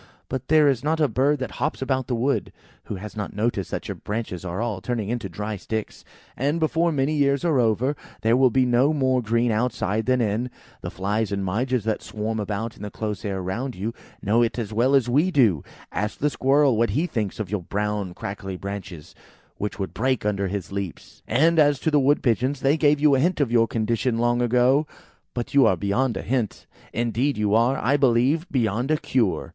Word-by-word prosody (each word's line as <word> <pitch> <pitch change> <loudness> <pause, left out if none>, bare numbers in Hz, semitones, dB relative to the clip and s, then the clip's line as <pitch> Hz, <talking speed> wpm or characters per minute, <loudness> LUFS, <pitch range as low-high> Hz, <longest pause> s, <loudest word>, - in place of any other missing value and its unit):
But 130 -2 -4
there 155 -1 +5
is 135 -3 +1
not 160 +2 0
a 150 - +4
bird 135 +5 +2
that 130 - -4
hops 150 +3 -1
about 130 -1 -1
the 125 - -1
wood, 130 +5 0 0.3
who - - -5
has 100 +2 -8
not 105 -2 -5
noticed 105 -3 -1
that - - -4
your - - -3
branches 105 -4 -5
are 90 +1 -4
all 110 -5 -2
turning 115 -1 -2
into 115 -4 -3
dry 105 +4 -4
sticks; 110 +3 -5 0.3
and 145 +5 0
before 165 +2 +1
many 140 0 0
years 140 +1 +1
are 155 -6 +3
over, 120 +5 +1 0.3
there 115 +1 +4
will 130 0 +5
be 130 +2 +2
no 125 +5 +3
more 130 -3 +2
green 115 +1 +1
outside 110 -1 -1
than 130 0 +3
in. 115 +2 0 0.3
The - - -5
flies 105 +3 -2
and 100 -1 -2
midges 120 +5 0
that 110 -1 -1
swarm 110 +1 -4
about 105 +2 -3
in - - -15
the 105 - -5
close 105 0 -4
air 95 -2 -3
round 120 +8 -3
you, 105 +5 -3 0.3
know 110 +4 +3
it 115 0 0
as 110 -3 -4
well 125 +5 +3
as 135 -3 +3
we 145 +9 +3
do. 115 - +3 0.3
Ask 105 +4 -2
the 150 +1 0
Squirrel 135 -1 +3
what 115 +1 +2
he 160 - +2
thinks 110 - -3
of 100 -4 -4
your 105 -3 -1
brown 100 0 -3
crackly 95 -1 -6
branches, 95 -5 -7 0.4
which 105 -1 -4
would 95 -2 -4
break 130 -1 0
under 100 -2 0
his 95 -2 -4
leaps. 100 -3 -6
And 160 +4 +3
as 145 -2 +4
to 160 - 0
the 150 - +4
Wood 140 +2 +2
pigeons, 130 +3 +1
they 140 +2 +3
gave 150 -2 +3
you 150 -1 +4
a 135 - +3
hint 175 +5 +1
of 135 -5 +1
your 115 -1 +4
condition 115 +2 0
long 120 +1 +1
ago. 125 +5 +3 0.5
But 120 -1 -4
you 140 -2 +6
are 95 - +2
beyond 115 +7 0
a - - -4
hint. 120 -4 -2 0.3
Indeed, 120 +4 0
you 105 -1 +1
are, 120 +4 +3
I 140 +5 +2
believe, 135 +6 +2
beyond 120 0 0
a 155 - +3
cure." 120 -10 0
120 Hz, 215 wpm, -24 LUFS, 105-135 Hz, 0.5 s, you